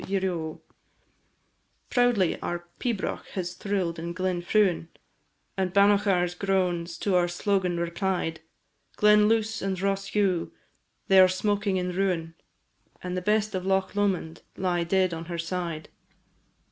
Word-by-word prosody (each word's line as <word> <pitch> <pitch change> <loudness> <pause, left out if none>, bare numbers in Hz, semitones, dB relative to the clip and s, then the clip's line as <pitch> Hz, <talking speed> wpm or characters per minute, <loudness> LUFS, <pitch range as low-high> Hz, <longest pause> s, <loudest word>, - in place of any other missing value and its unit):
ieroe! 180 -5 -2 1.3
Proudly 245 -8 +3
our 175 0 -4
pibroch 230 -6 -2
has 180 -2 -3
thrill'd 185 -5 -2
in 170 +1 -4
Glen 185 -1 -1
Fruin, 180 -2 +2 0.7
And 190 -2 -1
Bannochar's 200 -2 +3
groans 180 -3 -1
to 200 +2 -1
our 175 -1 +3
slogan 180 0 0
replied; 170 -1 -2 0.6
Glen 210 0 +5
Luss 220 0 0
and 190 -1 -2
Ross 195 0 -1
dhu, 190 -5 0 0.6
they 190 -1 +6
are 185 - +9
smoking 200 +1 0
in 180 0 -1
ruin, 180 -3 -1 0.7
And 180 0 -3
the 185 - -2
best 215 +2 +1
of 185 -1 -2
Loch 190 0 0
Lomond 190 -5 -1 0.2
lie 180 -2 0
dead 185 +1 +1
on 165 0 -5
her 170 0 -5
side. 170 -2 -4
185 Hz, 135 wpm, -27 LUFS, 175-200 Hz, 1.3 s, are